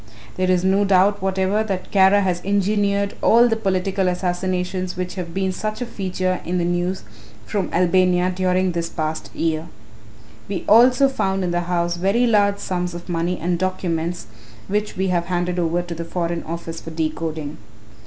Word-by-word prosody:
There 185 0 0
is 180 -1 +2
no 190 +2 +3
doubt 195 +1 +3
whatever 190 +2 +1
that 195 -4 -4
Kara 195 +1 +5
has 180 -2 0
engineered 200 0 +1
all 235 +2 +6
the 225 - +1
political 195 -2 0
assassinations 180 0 -2
which 180 0 -3
have 180 -3 -5
been 190 +1 -1
such 215 +3 -4
a 245 - -2
feature 185 -4 -2
in 180 +2 -2
the 175 - 0
news 175 +2 -1 0.4
from 200 -4 -2
Albania 180 0 +3
during 185 0 +1
this 170 -1 -2
past 155 -1 -3
year. 160 0 -1 0.8
We 195 -3 -3
also 250 +5 +6
found 195 -7 -1
in 180 - -1
the 175 0 0
house 175 -1 0
very 195 +7 +2
large 205 -3 +3
sums 180 -2 -3
of 175 +1 -9
money 175 +1 -1
and 175 +1 -1
documents 175 - -2 0.4
which 210 0 -2
we 190 0 0
have 175 -1 +1
handed 175 0 -1
over 170 +1 0
to 175 -1 -6
the 170 0 -5
Foreign 170 0 -2
Office 165 0 -6
for - - -8
decoding." 155 -1 -3
185 Hz, 175 wpm, -21 LUFS, 175-195 Hz, 0.8 s, all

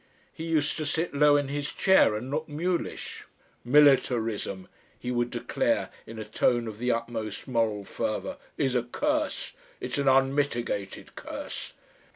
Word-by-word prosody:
He 160 - -6
used 160 -3 +1
to 155 - -2
sit 160 +3 -1
low 145 0 +5
in 145 -1 0
his 145 +1 -3
chair 190 - +4
and 125 +5 -5
look 155 +2 -2
mulish. 170 +4 -3 0.4
"Militarism," 120 -8 +3 0.3
he 125 - -4
would 120 0 0
declare - - 0 0.2
in 115 - -8
a 110 - -5
tone 120 +2 +1
of 110 -1 -7
the 125 +1 0
utmost 115 -2 -3
moral 115 -5 0
fervour, - - -3 0.2
"is 135 -2 +1
a 125 - +3
curse. 295 - -1 0.3
It's - - -3
an 140 - 0
unmitigated 135 -6 +1
curse." - - -6
130 Hz, 150 wpm, -28 LUFS, 115-150 Hz, 0.4 s, low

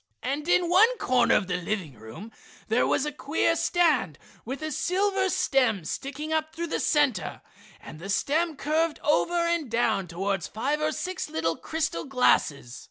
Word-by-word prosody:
And 285 +5 -3
in 355 0 +3
one 435 +8 +5
corner 250 - +3
of 195 - +2
the 180 -1 -2
living 180 -4 -3
room 110 - -11 0.4
there 225 +3 +2
was 280 - +1
a 300 - -2
queer 300 +3 0
stand 330 - +1 0.3
with 270 +6 -6
a 310 - -3
silver 385 +5 0
stem 250 - +1
sticking 290 - -4
up 315 0 -1
through 340 0 -4
the - - 0
center, 270 - 0 0.4
and 155 - -11
the 195 +4 -8
stem 310 - 0
curved 310 +3 0
over 320 +3 +2
and 335 -5 -1
down 220 -5 +1
towards 195 +2 -2
five 280 +8 -2
or 305 0 +1
six 370 +4 -4
little 165 +1 -1
crystal 320 0 -3
glasses. 145 - +1
280 Hz, 165 wpm, -26 LUFS, 200-325 Hz, 0.4 s, one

